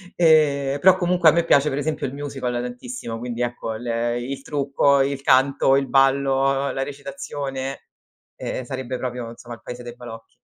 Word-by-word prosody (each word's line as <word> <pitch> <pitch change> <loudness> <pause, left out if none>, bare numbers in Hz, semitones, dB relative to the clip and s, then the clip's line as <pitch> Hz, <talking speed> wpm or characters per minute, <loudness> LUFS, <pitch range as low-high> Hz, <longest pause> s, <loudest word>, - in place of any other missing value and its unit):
Ehm, 145 -4 +3
però 185 +2 +6
comunque 175 -1 +2
a - - +6
me 170 +1 +2
piace 145 -3 +4
per 135 - -3
esempio 155 +1 -2
il 130 - -4
musical 135 -3 -4
tantissimo, 120 -1 -5
quindi 120 0 -5
ecco 120 -2 -3
l 120 +3 -7 0.3
il 135 +2 -5
trucco, 140 -1 +2
il 135 0 -1
canto, 135 +1 +4
il 135 0 +1
ballo, 135 0 +2
la 135 - -2
recitazione, 140 -1 -5 0.6
ehm, 130 - -4
sarebbe 130 0 -5
proprio 125 -2 -4
insomma 120 0 -10
il 115 - -21
paese 125 0 -7
dei 120 0 -8
balocchi. 115 -2 -11
135 Hz, 170 wpm, -22 LUFS, 125-140 Hz, 0.6 s, però